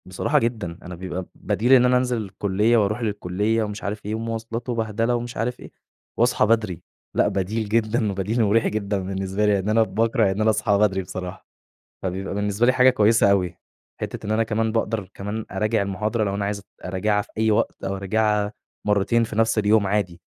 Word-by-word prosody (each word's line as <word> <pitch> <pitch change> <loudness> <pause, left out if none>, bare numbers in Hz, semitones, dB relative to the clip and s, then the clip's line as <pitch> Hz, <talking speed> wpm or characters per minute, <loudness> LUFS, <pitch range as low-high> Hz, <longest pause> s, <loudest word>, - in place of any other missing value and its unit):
بصراحة 95 -1 +1
جدًا، 110 -8 -2
أنا 90 0 -7
بيبقى 90 +1 -5
بديل 110 +5 +1
إن 125 -1 +7
أنا 125 0 +4
أنزِل 125 -1 0
الكُلِّيَّة 105 +2 +1
وأروح 110 +2 +1
للكُلِّيَّة 105 +1 0
ومش 105 -1 -5
عارف 105 +1 -4
إيه، 105 +1 -2
ومواصلات 115 +1 -4
وبهدلة 115 0 0
ومش 120 0 -5
عارف 125 +2 -2
إيه، - - -11 0.5
واصحى 120 +1 +3
بدري 110 -6 +1 0.3
لأ، - - +3
بديل 105 +3 -2
جدًا 110 -1 +1
وبديل 100 +5 0
مُريح 110 +2 +3
جدًا 100 -1 -1
بالنسبة 95 +2 -2
لي، 105 - +4
لإن 100 +1 0
أنا 110 +1 +4
باكره 110 +1 +1
إن 100 +3 -2
أنا 110 - +4
أصحى 105 -1 +2
بدري 100 -2 +2
بصراحة، 90 0 -7 0.6
فبيبقى 95 +1 -3
بالنسبة 105 +3 +1
لي 130 - +5
حاجة 130 0 +6
كويسة 110 -3 +4
أوي. 90 -4 +1 0.4
حِتّة - - -5
إن 105 - -1
أنا 110 +1 +2
كمان 110 0 0
باقدر 110 -3 -1
كمان 105 +3 -4
أراجع 110 0 0
المُحاضرة 105 +3 -1
لو 100 -1 -2
أنا 100 0 -2
عايز 100 0 -2
ات 100 - -15 0.2
أراجعها 105 +3 0
في - - -19
أي 110 0 +3
وقت، 105 - 0
أو 95 - -2
أراجعها 105 +1 0 0.3
مرتين 105 +3 +2
في 110 -1 -7
نفس 115 0 +2
اليوم 105 0 +3
عادي، 95 -4 -1
105 Hz, 195 wpm, -23 LUFS, 100-115 Hz, 0.6 s, إن